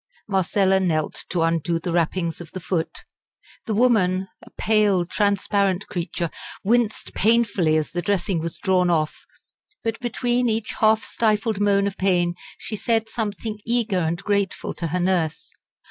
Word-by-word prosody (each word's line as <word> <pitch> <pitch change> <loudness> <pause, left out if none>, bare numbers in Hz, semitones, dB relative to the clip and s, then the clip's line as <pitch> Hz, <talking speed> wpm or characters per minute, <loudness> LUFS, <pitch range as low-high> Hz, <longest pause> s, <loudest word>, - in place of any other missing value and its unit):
Marcella 190 0 +2
knelt 160 -5 -1
to 175 -2 0
undo 165 0 +1
the 170 +1 -4
wrappings 170 0 0
of 165 - -9
the 185 - -4
foot. 165 -2 -3 0.6
The 220 - 0
woman, 190 -6 +3
a - - -14
pale 210 -5 +3
transparent 200 0 +1
creature, 170 -1 -3 0.3
winced 230 +1 +1
painfully 205 -8 +3
as 155 - -2
the 175 - -2
dressing 195 -2 0
was 165 0 -4
drawn 185 -1 +2
off; 155 -3 -1 0.6
but 225 -1 -2
between 245 0 0
each 220 0 -1
half 220 0 +4
stifled 215 -1 0
moan 200 -1 +3
of 200 -1 -3
pain 180 -2 +2 0.2
she 215 - -5
said 225 +2 0
something 215 -1 -3
eager 230 -5 +1
and 165 0 0
grateful 200 -2 -1
to 170 - -3
her 180 +3 -1
nurse. 175 -3 0
195 Hz, 150 wpm, -23 LUFS, 175-215 Hz, 0.6 s, half